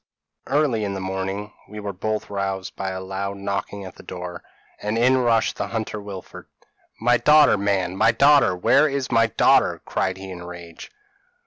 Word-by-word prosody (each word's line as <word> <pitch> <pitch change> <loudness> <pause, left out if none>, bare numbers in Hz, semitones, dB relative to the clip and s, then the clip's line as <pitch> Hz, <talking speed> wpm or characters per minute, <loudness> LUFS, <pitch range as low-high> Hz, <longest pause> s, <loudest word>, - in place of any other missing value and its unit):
p> - - -5
"Early 140 -7 +2
in 100 -1 -2
the - - -4
morning 95 +2 -4 0.2
we 105 +1 -8
were 100 -1 -5
both 110 +4 -3
roused 95 -1 -3
by 95 -1 -3
a 95 0 -4
loud 95 +1 -4
knocking 100 0 -4
at 95 - -11
the - - -11
door, 90 -1 -7 0.4
and 105 +2 -2
in 130 +3 +4
rushed 115 -3 +1
the - - -2
hunter 110 -2 -4
Wilfred. 100 -2 -9 0.5
"'My 120 +2 +3
daughter 150 +3 +6
man 95 -3 0
my 110 +3 +4
daughter! 140 -4 +5
where 140 +11 +4
is 135 -2 -3
my 115 -1 +4
daughter?' 110 - +3
cried 95 0 -1
he 95 0 -8
in 90 -1 -8
a 90 - -9
rage. 85 -2 -10
100 Hz, 190 wpm, -23 LUFS, 95-115 Hz, 0.5 s, daughter